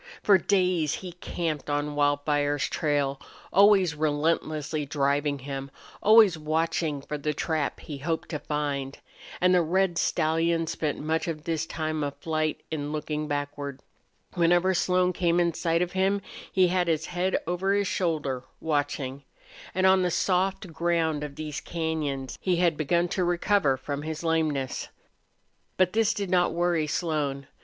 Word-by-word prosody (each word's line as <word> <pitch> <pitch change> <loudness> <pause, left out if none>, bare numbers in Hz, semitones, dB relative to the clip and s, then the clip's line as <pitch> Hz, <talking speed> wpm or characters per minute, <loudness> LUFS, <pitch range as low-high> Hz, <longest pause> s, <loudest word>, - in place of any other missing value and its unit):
For 200 -2 +6
days 180 -6 +1
he 180 - -5
camped 165 -3 -4
on 145 0 -1
Wildfire's 145 0 +1
trail, 145 -3 0 0.3
always 195 -4 +5
relentlessly 155 0 0
driving 145 0 0
him, 135 0 -6 0.3
always 215 -6 +6
watching 155 -1 -1
for 150 +1 -5
the 150 +1 -2
trap 155 -1 -1
he 145 -3 -7
hoped 160 +3 -2
to 150 - -3
find. 145 -3 -3 0.4
And 180 0 +4
the 180 - +5
red 175 +1 +1
stallion 165 +1 +1
spent 155 -2 -2
much 160 +2 -1
of 155 -2 -4
this 165 -1 -2
time 155 -1 -2
of 140 -1 -3
flight 155 -1 -2
in 145 -2 -3
looking 150 0 -3
backward. 145 -1 -4 0.5
Whenever 175 +1 +3
Slone 180 +1 +2
came 175 -1 +2
in 170 -1 +2
sight 165 +1 +1
of 175 - -4
him 195 +1 +1 0.3
he 185 -2 +4
had 180 -1 +1
his 160 -1 0
head 180 +2 0
over 180 +3 0
his 205 0 +1
shoulder, 150 -9 -1 0.2
watching. 145 -3 -2 0.5
And 185 0 +2
on 190 0 +5
the 180 - +1
soft 190 0 0
ground 165 -3 0
of 145 -1 -6
these 150 -1 -5
cañons 155 -5 -3
he 185 -2 +1
had 170 -2 +2
begun 170 +4 +1
to 185 - 0
recover 175 -4 +2
from 145 +2 -4
his 155 +1 -5
lameness. 155 -5 0 0.9
But 185 -1 +3
this 225 -1 +3
did 200 -3 -3
not 180 -1 +3
worry 170 -2 +1
Slone. 145 -4 -1
160 Hz, 155 wpm, -27 LUFS, 145-175 Hz, 0.9 s, For